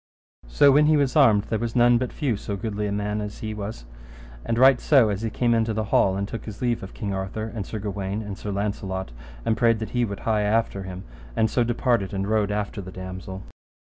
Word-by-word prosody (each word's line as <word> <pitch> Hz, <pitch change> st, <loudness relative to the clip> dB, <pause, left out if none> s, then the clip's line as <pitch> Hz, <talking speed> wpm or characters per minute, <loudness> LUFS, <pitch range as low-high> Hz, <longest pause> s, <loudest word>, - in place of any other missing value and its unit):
So 140 Hz, -, +5 dB
when 150 Hz, +2 st, +5 dB
he 155 Hz, 0 st, +5 dB
was 140 Hz, -3 st, +1 dB
armed 110 Hz, -9 st, +5 dB
there 110 Hz, -, -2 dB
was 115 Hz, -1 st, -3 dB
none 120 Hz, 0 st, +5 dB
but 125 Hz, -1 st, -2 dB
few 135 Hz, -7 st, -1 dB
so 100 Hz, 0 st, -5 dB
goodly 105 Hz, 0 st, -3 dB
a -, -, -3 dB
man 105 Hz, +1 st, -2 dB
as 105 Hz, 0 st, -7 dB
he 110 Hz, -, -3 dB
was; 105 Hz, -, -6 dB, 0.6 s
and 115 Hz, -, -1 dB
right 130 Hz, 0 st, +6 dB
so 130 Hz, -7 st, +5 dB
as 100 Hz, 0 st, -2 dB
he 115 Hz, -, -1 dB
came 120 Hz, +2 st, +1 dB
into 115 Hz, -1 st, +1 dB
the 110 Hz, -, 0 dB
hall 95 Hz, 0 st, +4 dB
and 100 Hz, 0 st, -2 dB
took 115 Hz, -, -7 dB
his 105 Hz, -2 st, -8 dB
leave 120 Hz, -2 st, 0 dB
of 95 Hz, -, -9 dB
King 100 Hz, -4 st, -3 dB
Arthur, 95 Hz, +3 st, -4 dB
and 105 Hz, -4 st, -5 dB
Sir 110 Hz, -, -5 dB
Gawaine, 100 Hz, 0 st, -3 dB
and 100 Hz, -2 st, -6 dB
Sir 105 Hz, -, -7 dB
Launcelot, 100 Hz, -, -3 dB, 0.3 s
and 110 Hz, -, +2 dB
prayed 115 Hz, 0 st, +3 dB
that 110 Hz, 0 st, -5 dB
he 120 Hz, -1 st, +1 dB
would 100 Hz, -4 st, -4 dB
hie 110 Hz, -2 st, +1 dB
after 105 Hz, -1 st, 0 dB
him, 95 Hz, 0 st, -7 dB, 0.3 s
and 110 Hz, -, +2 dB
so 120 Hz, -, +2 dB
departed 120 Hz, -4 st, 0 dB
and 95 Hz, 0 st, -2 dB
rode 105 Hz, -1 st, +1 dB
after 105 Hz, 0 st, -3 dB
the 95 Hz, 0 st, -9 dB
damosel. 95 Hz, +1 st, -7 dB
105 Hz, 235 wpm, -24 LUFS, 100-115 Hz, 0.6 s, right